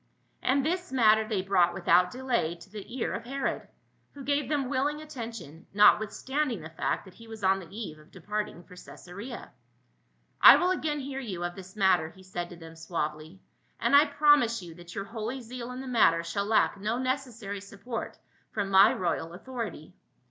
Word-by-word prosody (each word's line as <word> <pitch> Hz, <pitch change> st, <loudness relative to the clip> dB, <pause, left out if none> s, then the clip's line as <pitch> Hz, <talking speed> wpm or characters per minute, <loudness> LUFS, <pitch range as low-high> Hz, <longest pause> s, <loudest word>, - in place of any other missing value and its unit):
And 270 Hz, +1 st, +2 dB
this 360 Hz, +2 st, -2 dB
matter 220 Hz, -4 st, +4 dB
they 205 Hz, -4 st, -1 dB
brought 180 Hz, -3 st, +3 dB
without 180 Hz, -1 st, +4 dB
delay 245 Hz, -10 st, -1 dB
to 175 Hz, +3 st, -16 dB
the 215 Hz, +4 st, -8 dB
ear 240 Hz, -, -1 dB
of -, -, -4 dB
Herod, 270 Hz, +3 st, -3 dB, 0.5 s
who 280 Hz, -, -9 dB
gave 285 Hz, -1 st, 0 dB
them 285 Hz, -4 st, 0 dB
willing 285 Hz, +3 st, 0 dB
attention, 230 Hz, -, -8 dB
not 210 Hz, 0 st, +7 dB
withstanding 260 Hz, -, -2 dB
the 160 Hz, +1 st, -9 dB
fact 160 Hz, -, -2 dB
that 190 Hz, -, -14 dB
he 230 Hz, +4 st, -15 dB
was 220 Hz, -2 st, -10 dB
on 190 Hz, +1 st, +3 dB
the 175 Hz, -3 st, -11 dB
eve 195 Hz, -7 st, -7 dB
of 155 Hz, -, -19 dB
depart 210 Hz, +3 st, -3 dB
ing 175 Hz, -, -13 dB
for 180 Hz, -, -15 dB
Caesarea. 200 Hz, +7 st, -9 dB, 0.5 s
" -, -, -42 dB
I -, -, +11 dB
will 360 Hz, +1 st, +2 dB
again 300 Hz, -5 st, -1 dB
hear 270 Hz, 0 st, -5 dB
you 195 Hz, -9 st, -5 dB
of 175 Hz, 0 st, -2 dB
this 190 Hz, +1 st, -11 dB
mat 190 Hz, -3 st, +4 dB
ter," 160 Hz, -, -5 dB
he 190 Hz, +2 st, -17 dB
said 175 Hz, -2 st, -5 dB
to 175 Hz, -, -10 dB
them 165 Hz, -1 st, -12 dB
suavely; 160 Hz, +1 st, -5 dB, 0.4 s
"and -, -, +3 dB
I 290 Hz, +2 st, +8 dB
promise 290 Hz, -7 st, +4 dB
you 170 Hz, -2 st, -9 dB
that 175 Hz, 0 st, -12 dB
your 200 Hz, -, -3 dB
holy 225 Hz, +4 st, -5 dB
zeal 245 Hz, 0 st, -7 dB
in 250 Hz, +1 st, -6 dB
the 265 Hz, -, -8 dB
matter 170 Hz, -9 st, +4 dB
shall 200 Hz, +4 st, -2 dB
lack 210 Hz, -1 st, +2 dB
no 215 Hz, +4 st, -1 dB
neces 255 Hz, 0 st, -2 dB
sary 205 Hz, -3 st, -6 dB
support 200 Hz, +4 st, -6 dB, 0.3 s
from 200 Hz, -2 st, -2 dB
my 195 Hz, +3 st, +7 dB
royal 170 Hz, -2 st, -2 dB
authority." 215 Hz, -5 st, -6 dB
210 Hz, 200 wpm, -28 LUFS, 180-255 Hz, 0.5 s, I